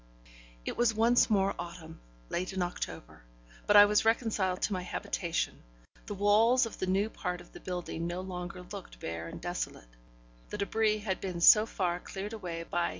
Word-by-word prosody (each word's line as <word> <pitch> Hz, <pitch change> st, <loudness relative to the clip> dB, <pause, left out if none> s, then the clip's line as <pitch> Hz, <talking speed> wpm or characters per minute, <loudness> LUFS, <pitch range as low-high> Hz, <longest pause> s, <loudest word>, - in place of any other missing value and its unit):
It -, -, -4 dB
was 235 Hz, -2 st, +3 dB
once 235 Hz, +3 st, +4 dB
more 195 Hz, -2 st, +2 dB
autumn; 165 Hz, -2 st, -8 dB, 0.3 s
late 185 Hz, +2 st, -2 dB
in 190 Hz, -1 st, 0 dB
October. 175 Hz, -, -6 dB, 0.5 s
But 205 Hz, -, +4 dB
I 205 Hz, 0 st, +11 dB
was 210 Hz, 0 st, +3 dB
reconciled 220 Hz, -5 st, +1 dB
to 210 Hz, -, +1 dB
my 185 Hz, -, -2 dB
habitation; 180 Hz, -1 st, -3 dB, 0.5 s
the 205 Hz, -, -4 dB
walls 220 Hz, +6 st, +4 dB
of 225 Hz, -, -8 dB
the 185 Hz, -, -1 dB
new 195 Hz, +3 st, +2 dB
part 180 Hz, -5 st, -4 dB
of 175 Hz, -, -15 dB
the -, -, -10 dB
building 175 Hz, -2 st, -4 dB
no 175 Hz, +1 st, -3 dB
longer 180 Hz, -1 st, -6 dB
looked -, -, -10 dB
bare 80 Hz, +3 st, -5 dB
and -, -, -8 dB
desolate; -, -, -5 dB, 0.5 s
the -, -, -5 dB
débris 215 Hz, +1 st, +1 dB
had 190 Hz, -3 st, -2 dB
been 180 Hz, -3 st, -4 dB
so 215 Hz, +5 st, +8 dB
far 175 Hz, -4 st, -1 dB
cleared 200 Hz, +4 st, -6 dB
away 175 Hz, -6 st, -5 dB
by 170 Hz, 0 st, 0 dB
M. -, -, -3 dB
185 Hz, 185 wpm, -31 LUFS, 175-210 Hz, 0.5 s, I